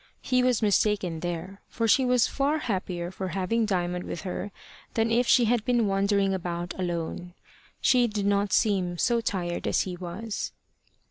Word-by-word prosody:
He 255 -1 +2
was 250 -3 +2
mistaken 205 -5 +1
there, 175 +3 -5
for 230 -1 -1
she 255 +5 +4
was 250 -2 +4
far 285 +3 0
happier 185 - -3
for 190 0 -4
having 195 +5 0
Diamond 180 -2 -1
with 165 - -5
her 200 +2 -4 0.4
than 225 0 +1
if 240 +1 +2
she 245 - +5
had 230 -1 +2
been 240 -2 +2
wandering 195 0 +2
about 175 -1 -3
alone. 175 0 -3 0.5
She 250 -2 +4
did 210 -2 -3
not 200 0 +1
seem 185 -5 +1
so 235 +5 +2
tired 175 -5 -2
as - - +2
he 185 -2 -4
was. 185 +5 -5
200 Hz, 170 wpm, -27 LUFS, 180-230 Hz, 0.5 s, she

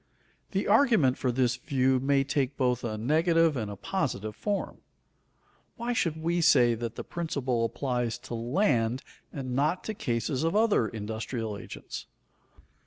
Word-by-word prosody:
The 195 0 -1
argument 215 - +4
for 130 - +1
this 125 0 +1
view 130 -1 +1
may 135 +1 +2
take 135 0 -1
both 125 -2 +1
a 110 -2 -3
negative 160 +6 +3
and 110 -5 -3
a 100 - -6
positive 110 - -2
form. 205 -1 -2 1.0
Why 235 +1 -2
should 165 -8 0
we 170 +2 0
say 120 -7 +5
that 115 0 -4
the - - -5
principle 135 -8 -2
applies 120 0 -2
to - - -6
land 120 - +1 0.3
and 130 -3 -5
not 150 +7 +1
to 220 - -3
cases 125 - -1
of 165 +4 +1
other 215 - +3
industrial 110 +1 -4
agents? 100 - -8
130 Hz, 150 wpm, -28 LUFS, 120-165 Hz, 1.0 s, say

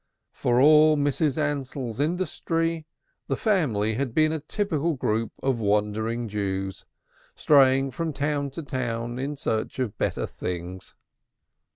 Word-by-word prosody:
For 120 0 +1
all 155 +2 +6
Mrs. 145 0 +1
Ansell's 135 -5 -2
industry, 165 0 -1 0.4
the - - 0
family 140 - +1
had 125 0 -3
been 155 0 +4
a 160 - -2
typical 165 -1 -1
group 115 -3 -1
of 135 -3 +1
wandering 110 +3 0
Jews, 95 -2 -3 0.5
straying 135 -2 +4
from 165 +3 -3
town 145 0 -1
to 165 - -4
town 120 -3 -3
in 140 +2 -3
search 110 -4 -2
of 125 -6 -3
better - - -1
things. 90 +1 -6
135 Hz, 130 wpm, -25 LUFS, 110-155 Hz, 0.5 s, all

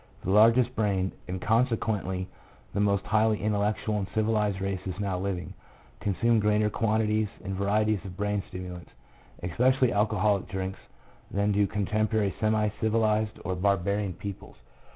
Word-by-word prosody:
The 95 - -1
largest 115 +4 +5
brained, 95 -3 0 0.2
and 90 0 -4
consequently 110 -4 0 0.5
the - - -1
most 100 -1 +2
highly 110 0 +2
intellectual 105 0 0
and 95 - -3
civilized 105 -3 +1
races 95 -1 -3
now 95 -3 -1
living, 95 -2 -3 0.5
consume 110 +4 +2
greater 105 0 +2
quantities 110 -1 +1 0.2
and 95 0 -4
varieties 105 0 +1
of 95 -2 -9
brain 105 0 0
stimulants, 90 -1 -8 0.5
especially 125 +8 +2
alcoholic 105 -1 +1
drinks, 95 0 -4 0.5
than 100 +1 +1
do 100 0 +2
contemporary 105 0 0
semi 110 0 +2
civilized 110 -1 +1
or 95 - -1
barbarian 100 +1 0
peoples. 100 0 -8
105 Hz, 130 wpm, -28 LUFS, 95-110 Hz, 0.5 s, largest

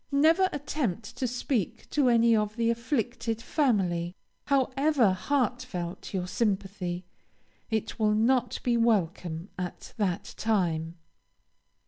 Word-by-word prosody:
Never 320 +7 +4
attempt 255 - -3
to 255 - 0
speak 245 - -2
to 280 -4 +3
any 230 -1 +5
of 210 -1 0
the 230 0 +2
afflicted 235 -1 -2
family. 190 - 0 0.3
However 270 -3 +3
heartfelt 250 -6 -2
your 185 -2 -2
sympathy, 190 -4 -2 0.6
it 220 +1 -2
will 210 -1 +3
not 245 +4 +2
be 240 -1 +2
welcome 180 -6 0
at 180 -1 -6
that 200 -1 -1
time. 170 -7 0
225 Hz, 110 wpm, -28 LUFS, 185-255 Hz, 0.6 s, any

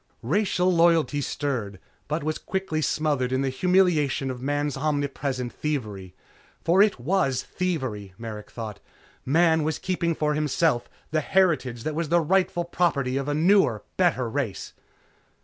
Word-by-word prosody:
Racial 180 - +1
loyalty 165 -4 +3
stirred, 120 -10 -3 0.3
but 150 0 -2
was 155 +1 -2
quickly 190 -5 -2
smothered 145 -3 0
in 130 +1 +1
the 135 - 0
humiliation 155 -4 +2
of 125 -1 -7
man's 145 +1 -1
omnipresent 140 -3 -2
thievery. 105 -11 -4 0.4
For 180 +4 +3
it 205 - +3
was 135 -2 +1
thievery, 130 - -3
Merrick 110 -2 -7
thought. 110 -3 -7 0.5
Man 160 +3 +4
was 155 0 -1
keeping 170 -3 -1
for 150 -1 0
himself 150 -3 +1 0.2
the 155 0 +1
heritage 150 -10 +1
that 155 - -2
was 160 0 -2
the 170 +1 +4
rightful 175 +1 +1
property 150 -7 0
of 135 +1 -2
a 145 - 0
newer, 160 - +3
better 170 -9 +2
race. 115 -4 -3
150 Hz, 145 wpm, -25 LUFS, 130-170 Hz, 0.5 s, Man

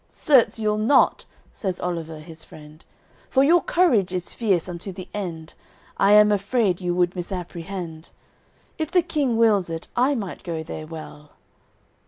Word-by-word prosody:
"Certes, 265 -7 +3
you'll 215 -1 0
not," 225 +7 +3 0.3
says 190 -4 -4
Oliver 165 -3 -4
his 160 0 -10
friend, 155 +1 -14 0.5
"For 265 - +3
your 335 +4 +5
courage 240 - +2
is 180 -1 -4
fierce 195 -8 0
unto 180 +2 -6
the 185 0 -9
end, 170 -6 -5 0.4
I 200 +1 +4
am 210 0 +7
afraid 200 -2 +1
you 175 -1 -1
would 175 0 +1
misapprehend. 175 -2 -6 0.7
If 315 -1 -2
the 355 0 +3
King 290 -8 0
wills 210 -6 +3
it 165 0 -6
I 265 +4 +2
might 200 -7 -5
go 165 -3 -4
there 155 -1 -7
well." 155 -2 -10
185 Hz, 155 wpm, -23 LUFS, 170-225 Hz, 0.7 s, am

